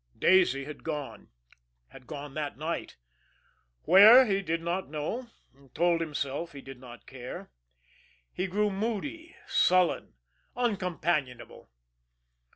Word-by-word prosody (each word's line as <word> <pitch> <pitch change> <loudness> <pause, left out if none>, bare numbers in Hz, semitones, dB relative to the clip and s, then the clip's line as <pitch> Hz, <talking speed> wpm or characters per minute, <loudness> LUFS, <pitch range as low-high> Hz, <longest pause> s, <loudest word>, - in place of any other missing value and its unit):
Daisy 140 -8 +3
had 150 0 -10
gone 150 -3 -6 0.6
had 125 -2 -15
gone 145 -2 -8
that 150 -2 -4
night 160 +3 -4 0.9
where, 220 +7 +8
he 200 -3 0
did 165 -2 -2
not 170 +2 -3
know, 155 - -4 0.2
and 135 -1 -24
told 170 0 +2
himself 150 +1 -4
he 140 - -9
did 135 -1 -11
not 120 -4 -13
care. 125 -1 -9 0.8
He 185 - -2
grew 205 +3 0
moody, 260 - -4
sullen, 180 - +2 0.4
uncompanionable. 175 - -2
165 Hz, 115 wpm, -28 LUFS, 140-195 Hz, 0.9 s, where